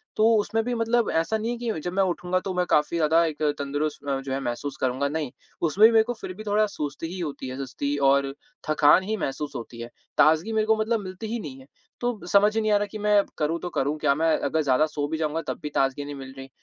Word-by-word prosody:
तो 215 - +3
उसमें 225 +2 0
भी 245 +1 -2
मतलब 230 0 +1
ऐसा 165 +7 +1
नहीं 225 +2 -2
है 240 - -3
कि 230 -7 -3
जब 175 +3 -4
मैं 195 +1 +3
उठूँगा 180 0 0
तो 190 0 -4
मैं 180 0 +1
काफ़ी 150 +3 +2
ज़्यादा 165 +1 +4
एक 155 -2 -4 0.2
तंदुरुस्त 145 +2 -2 0.3
जो 135 - -4
है 135 - -1
महसूस 120 +3 -4
करूँगा, 130 +2 0
नहीं, 150 -4 -3 0.3
उसमें 185 +7 +6
भी - - +2
मेरे 220 -1 +6
को 245 - -3
फिर 215 -5 -7
भी 215 +4 -9
थोड़ा 210 0 +2
सुस्ती 150 -6 -5
ही 190 - -6
होती 150 -6 -4
है 130 - -6
सुस्ती 140 +1 -3
और 140 0 +2 0.4
थकान 155 +4 +5
ही 215 +3 -2
महसूस 140 -2 -3
होती 120 -1 -7
है। 120 - -6 0.3
ताज़गी 160 +8 +4
मेरे 215 0 +2
को 220 - +5
मतलब 220 +1 0
मिलती 185 +4 -7
ही 235 +2 -3
नहीं 135 -9 -8
है, 130 - -15 0.3
तो 245 -3 -1
समझ 205 +2 +4
ही 225 - +2
नहीं 215 0 +1
आ 205 - +5
रहा 205 - 0
कि 215 - -5
मैं 210 -1 +3
करूँ 160 +2 0
तो 180 - -5
करूँ 145 -2 -1
क्या? 140 - +2
मैं 160 +1 +2
अगर 160 - 0
ज़्यादा 140 +1 +3
सो 150 -2 -3
भी 160 +1 -3
जाऊँगा 160 0 -1
तब - - -3
भी 150 - -3
ताज़गी 135 +1 +1
नहीं 145 0 -6
मिल 135 -1 -9
रही। 135 0 -9
160 Hz, 260 wpm, -25 LUFS, 145-210 Hz, 0.4 s, उसमें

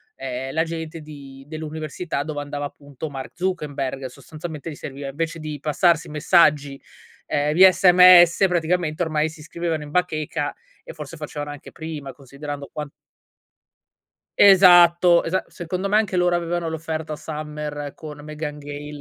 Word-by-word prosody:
ehm, 130 0 -5
la 160 +1 +2
gente 165 -1 -6
di 140 -3 -12
dell'università 155 0 -5
dove 150 -1 -5
andava 145 0 -5
appunto 145 +1 -8
Mark 135 -2 -7
Zuckerberg. 145 -7 -3
Sostanzialmente 155 +4 -8
gli 150 - -7
serviva 140 0 -7
invece 165 +3 -4
di 155 -2 -6
passarsi 165 +1 +2
messaggi, 150 -3 +2 0.4
ehm, 150 +1 0
via 185 +2 +8
sms 180 0 +7
praticamente 170 -1 0
ormai 155 -1 0
si 160 - -14
iscrivevano 160 0 -4
in 145 - -10
bacheca 155 -4 -1 0.3
e - - -9
forse 150 0 -9
facevano 150 -1 -6
anche 145 - -11
prima 155 -4 -7
considerando 140 +2 -8
quan 150 -1 -6 1.5
Esatto, 175 -3 +7
esatto. 185 +3 -2
Secondo 180 +3 -4
me 210 - +4
anche 210 -4 0
loro 175 -1 +2
avevano 170 -1 -2
l'offerta 160 -1 -4
Summer 150 -2 -6
con 150 -2 -9
Meghan 150 -1 -6
Gale 145 0 -8
155 Hz, 140 wpm, -22 LUFS, 145-170 Hz, 1.5 s, via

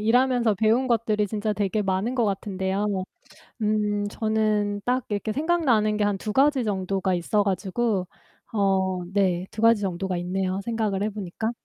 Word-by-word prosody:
일하면서 245 -1 +3
배운 225 +6 +2
것들이 215 -3 +1
진짜 215 0 -1
되게 205 +1 -1
많은 195 +6 -1
것 235 - +2
같은데요. 195 -1 -1 0.6
음, 210 -1 0
저는 215 -2 0
딱 250 +1 +1
이렇게 210 +1 -2
생각나는 265 -9 +2
게 210 - +1
한 205 -1 0
2 210 +1 -4
가지 270 0 +3
정도가 190 -2 -1
있어 190 +4 +1
가지고 195 0 -1 0.5
어 190 -3 +1
네. 185 -3 +1
2 215 - -6
가지 230 -2 +5
정도가 190 -1 -2
있네요 185 +2 -2
생각을 215 -3 -1
해 215 - 0
보니까. 210 +2 -4
210 Hz, 310 characters per minute, -25 LUFS, 190-225 Hz, 0.6 s, 가지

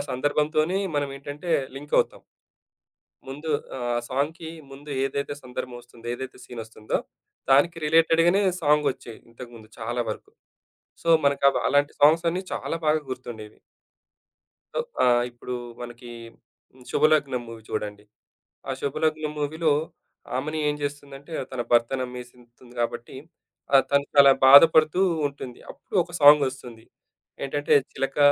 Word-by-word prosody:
సందర్భంతోనే 150 +6 0 0.2
మనమేంటంటే 145 +3 -4 0.3
లింకవుతాం. 145 +1 0 1.1
ముందు 145 +4 -7 0.3
ఆహ్, 120 -1 -1
సాంగ్‌కి 160 +5 -2 0.2
ముందేదైతే 140 0 -3
సందర్భం 125 0 -6
వస్తుందో 120 -1 -16
ఏదైతే 130 +1 -8
సీనొస్తుందో 115 -3 -5 0.5
దానికి 145 +6 +4
రిలేటెడ్‌గనే 165 +4 +4 0.2
సాంగొచ్చాయి 145 -6 0
ఇంతకుముందు 115 -2 -12
చాలా 120 +2 -3
వరకు. - - -8 0.7
సో, 165 - -2 0.2
మనకు 140 0 +1
అవ - - -1
అలాంటి 145 0 +2
సాంగ్స్ 155 +4 +5
అన్నీ 180 +3 -2
చాలా - - -3
బాగా 155 +1 +3
గుర్తుండేవి. 120 -4 -8 1.2
సో, - - 0 0.2
ఆహ్, 120 -1 +4
ఇప్పుడు 120 +1 -7 0.3
మనకి 120 0 -10 0.6
హ్మ్, 130 - -19
'శుభలగ్నం' 145 -5 +2
మూవీ 115 -1 -10
చూడండి. 105 0 -5 0.6
ఆ - - -2
'శుభలగ్నం' 155 +2 -1
మూవీలో 155 +2 0 0.6
ఆమెని 155 +4 -2
ఏం 145 - 0
చేస్తుందంటే, 145 +1 -6 0.2
తన 125 -2 -3
భర్తనమ్మేసకుంటుంది 125 0 -2
కాబట్టి. 120 +1 -4 0.6
ఆ! - - +7
తను 140 0 +2
చాలా 140 -1 +8
బాధపడుతూ 155 +5 +7 0.3
ఉంటుంది. 135 -3 -9
అప్పుడు - - -11
ఒక 175 - -15
సాంగొస్తుంది. 130 -5 +4 0.6
ఏంటంటే, 145 +1 0 0.2
'చిలక 135 +1 -3
140 Hz, 110 wpm, -25 LUFS, 120-150 Hz, 1.2 s, చాలా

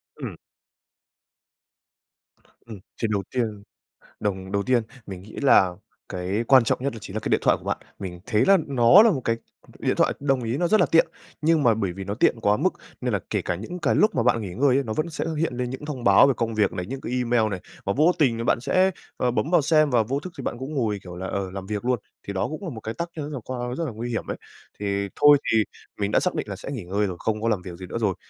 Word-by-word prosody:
Ừm. - - -6 2.3
Ừm, 110 -3 -8 0.2
chuyện 115 - -1
đầu 100 -1 0
tiên, 110 -5 -1 0.6
đồng 95 -2 -3
đầu 100 0 +1
tiên 125 +1 +2 0.2
mình 95 -2 -8
nghĩ 105 +2 -13
là 95 -9 +6 0.4
cái 95 +5 -2
quan 130 -3 +7
trọng - - +1
nhất 140 - -1
đó 115 - -8
chính 105 -1 -8
là - - -1
cái - - -4
điện - - +3
thoại - - +4
của - - -17
bạn, - - -1 0.2
mình 90 -3 -7
thấy 110 -3 +2
là 195 0 +6
nó 135 - +7
là 230 - +6
một 145 -9 -1
cái 115 - +1 0.4
điện - - 0
thoại, - - +3
đồng 135 -2 +1
ý 115 +3 -1
nó 175 +3 +1
rất 215 - +4
là - - +4
tiện, 165 - +4 0.4
nhưng 160 0 +3
mà 115 -4 +5
bởi 100 -4 -2
vì 95 +2 -7
nó 100 +1 -3
tiện 115 +1 +2
quá 105 -1 +3
mức - - +1 0.3
nên - - -1
là - - +2
kể - - 0
cả - - -1
những 110 - -6
cái - - +1
lúc 215 - +3
mà 120 - +2
bạn 115 -1 +2
nghỉ 95 -5 -6
ngơi 130 +4 +3
ấy, 140 - +1
nó 110 - -3
vẫn 155 +8 -2
sẽ 155 - -3
hiện 165 -3 0
lên 125 0 -2
những 130 +3 -6
thông 140 -5 -5
báo 100 +5 +7
về 135 - +2
công 115 -1 -1
việc 105 -3 +2
này, 90 - -4
những 135 +4 -5
cái - - -5
email 120 -3 +2
này, 95 -2 -4 0.2
và 100 - 0
vô 155 +5 +5
tình 130 -7 +3
rồi 115 - -3
bạn 120 - +2
sẽ, 185 +9 +3 0.3
à, 125 - +2
bấm 140 +5 -1
vào 175 -3 +4
xem 155 0 +3
và 120 -3 +4
vô 135 +6 -2
thức 180 +3 -8
thì - - -4
bạn 120 - -3
cũng 135 +4 -6
ngồi, 110 -7 0
kiểu 90 -1 -9
là, 95 +1 -5
ờ, 95 -1 -3
làm 95 0 -7
việc 105 +2 -4
luôn, 125 0 +1 0.3
thì 100 - -3
đó 95 - -1
cũng 155 +5 -6
là 175 - -4
một 115 -6 -7
cái 110 +1 -5
tác 170 +8 -3
nhân 150 -1 -4
rất - - -6
là 130 - -4
quan 125 -1 -4
rất 165 - -2
là 155 - -3
nguy 115 +3 -5
hiểm 115 - -3
ấy. - - -2 0.4
Thì 100 -1 -1
thôi 145 0 +8
thì 110 -1 +4 0.4
mình 100 0 0
đã - - +3
xác 180 - 0
định 155 -8 -3
là 100 - -4
sẽ 105 - -7
nghỉ 125 -9 -5
ngơi 100 +4 0
rồi, 90 -2 -4
không 110 -1 -1
có 115 - +1
làm 105 -5 0
việc 90 -2 -8
gì 90 +1 -8
nữa 105 - -4
rồi, 105 -5 +1
115 Hz, 280 wpm, -24 LUFS, 100-140 Hz, 2.3 s, thôi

